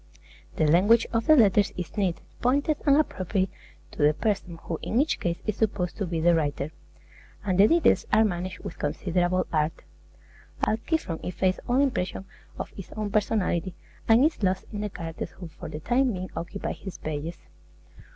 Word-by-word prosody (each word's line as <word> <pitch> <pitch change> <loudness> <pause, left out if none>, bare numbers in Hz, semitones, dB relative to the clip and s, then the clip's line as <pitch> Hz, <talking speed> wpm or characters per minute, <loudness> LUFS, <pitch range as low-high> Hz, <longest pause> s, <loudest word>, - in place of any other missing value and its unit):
The 155 - +2
language 195 +9 +5
of 230 0 0
the 310 - +8
letters 205 -5 +4
is 180 -2 -5
neat, 185 -5 0 0.2
pointed, 285 +4 +2
and 280 0 +6
appropriate 190 - 0 0.4
to - - -6
the 150 +1 +5
person 195 -5 -1
who 165 - -4
in 230 - 0
each 300 +3 +1
case 170 -1 -1
is 215 - -2
supposed 200 -5 0
to 200 - -2
be 165 -1 -2
the 170 +2 +4
writer; 150 -2 -1 0.7
and 190 -2 +1
the 205 - +8
details 335 +4 +3
are 220 +1 +5
managed 180 -2 -3
with - - -7
considerable 175 +4 0
art. 155 0 0 0.8
Alciphron 220 - 0
effaces 185 +1 0
all 250 +2 +3
impression 195 -9 0 0.3
of - - -5
his 195 - -10
own 215 -1 -3
personality, 195 -4 0 0.3
and 230 +5 +6
is 315 - 0
lost 190 -1 +1
in 205 - -3
the 210 - -2
characters 165 -4 -6
who 180 - -9
for 155 - -9
the 150 0 -6
time 245 - +2
being 185 -1 -5
occupy 185 +4 -4
his 190 -2 -8
pages. 155 +2 -4
190 Hz, 175 wpm, -26 LUFS, 170-220 Hz, 0.8 s, the